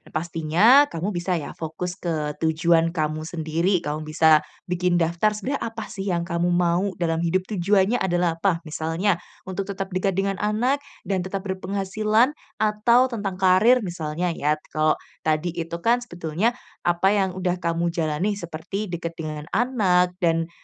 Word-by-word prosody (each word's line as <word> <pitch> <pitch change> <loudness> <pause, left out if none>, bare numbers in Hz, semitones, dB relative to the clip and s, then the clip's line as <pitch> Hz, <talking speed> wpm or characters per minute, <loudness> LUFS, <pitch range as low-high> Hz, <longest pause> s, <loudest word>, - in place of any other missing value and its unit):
pastinya 170 - +4
kamu 180 +6 -3
bisa 175 +1 -1
ya 150 - -5
fokus 165 +3 -5
ke 155 -4 -2
tujuan 165 +1 +3
kamu 155 -1 -1
sendiri 170 +3 0
kamu 150 +1 -2
bisa 155 0 +5 0.2
bikin 180 0 0
daftar 170 +5 +2
sebenarnya 255 +7 -3
apa 225 - -6
sih 195 -2 -4
yang 170 -1 0
kamu 170 0 0
mau 175 +2 +2
dalam 165 -2 0
hidup 180 +2 +1
tujuannya 200 +3 +2
adalah 175 -3 +1
apa? 175 -4 +1
Misalnya 165 +4 -1 0.3
untuk 190 +1 -4
tetap 195 -1 -4
dekat 185 0 0
dengan 195 0 0
anak 240 +7 +1 0.2
dan 190 -2 0
tetap 190 +2 -4
berpenghasilan 200 +6 +1 0.2
atau 220 +4 +3
tentang 200 -5 -3
karir 190 +7 +5
misalnya 170 0 -2
ya, 150 0 0 0.2
kalau 155 0 +2 0.2
tadi 160 +2 0
itu 170 -1 -4
kan 240 +1 +4
sebetulnya 180 +2 -2 0.2
apa 175 +2 +2
yang 195 -2 +2
sudah 180 -1 -1
kamu 170 0 0
jalani 165 +4 0
seperti 185 +2 -5
dekat 170 -1 -4
dengan 155 -2 -6
anak 190 -7 +2
dan, 165 -2 +1
180 Hz, 155 wpm, -24 LUFS, 165-200 Hz, 0.3 s, bisa